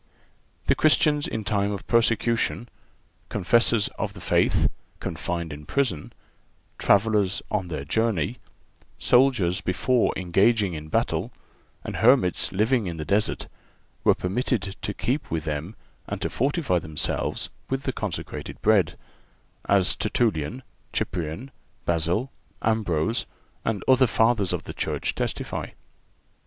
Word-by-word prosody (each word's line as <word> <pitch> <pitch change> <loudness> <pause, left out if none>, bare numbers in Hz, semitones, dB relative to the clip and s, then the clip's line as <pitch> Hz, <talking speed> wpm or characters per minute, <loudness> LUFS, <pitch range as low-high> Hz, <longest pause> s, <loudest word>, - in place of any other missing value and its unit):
The - - +4
Christians 150 -1 +3
in 110 - -3
time 100 -1 +1
of 100 -2 -5
persecution, 115 0 +1 0.6
confessors 110 +2 +3
of 105 -2 -2
the 100 - -10
faith - - +2 0.3
confined 85 -3 -3
in 75 0 -10
prison, 125 - -1 0.7
travellers 100 -1 +3
on 100 -4 0
their 75 -5 -4
journey, 110 - 0 0.6
soldiers 120 -9 +3
before 120 +6 +2
engaging 95 +2 +2
in 75 -1 -6
battle - - 0 0.5
and - - -5
hermits 115 -6 +4
living 110 +2 +2
in 85 -2 -4
the 75 - -4
desert 105 +4 0 0.6
were - - +5
permitted 100 0 -1
to 105 - -3
keep 135 +5 -1
with 80 -1 -2
them 80 +6 -4 0.3
and - - -4
to - - -1
fortify 135 - +1
themselves 75 -2 -2 0.2
with 135 +1 -1
the 130 - -1
consecrated 105 -6 -5
Bread—as 100 -1 0
Tertullian, 110 - 0 0.3
Cyprian, 90 - -3 0.3
Basil, 85 +10 0 0.3
Ambrose 110 -2 +1 0.4
and 110 -3 -1
other 130 0 +6
Fathers 110 -4 +2
of - - -2
the - - -7
Church - - -2
testify. - - -3
105 Hz, 120 wpm, -25 LUFS, 90-120 Hz, 0.7 s, other